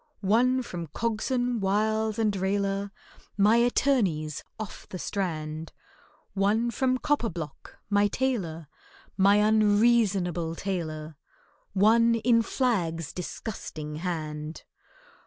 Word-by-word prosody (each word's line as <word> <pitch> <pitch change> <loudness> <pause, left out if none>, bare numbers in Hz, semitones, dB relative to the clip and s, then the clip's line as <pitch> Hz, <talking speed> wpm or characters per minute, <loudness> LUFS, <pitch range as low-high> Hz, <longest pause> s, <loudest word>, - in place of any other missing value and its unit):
One 250 +5 +3
from 170 -7 -6
COGSON, 235 - -1
WILES, 215 +2 +1
and 215 -3 +1
RAILER, 195 +1 -1 0.5
My 210 +3 +5
attorneys, 220 - +1 0.2
off 215 -3 -8
the 185 - -5
Strand; 160 -5 -4 0.6
One 210 +4 +1
from 255 +2 +1
COPPERBLOCK, 215 - -3
my 205 0 +4
tailor— 195 - -2 0.5
My 200 +1 +5
unreasonable 205 -5 +3
tailor— 160 -5 -4 0.6
One 230 +4 +4
in 230 +1 +3
FLAGG'S 170 - -1
disgusting 155 -5 -6
hand. 155 -2 -4
200 Hz, 95 wpm, -27 LUFS, 165-230 Hz, 0.6 s, My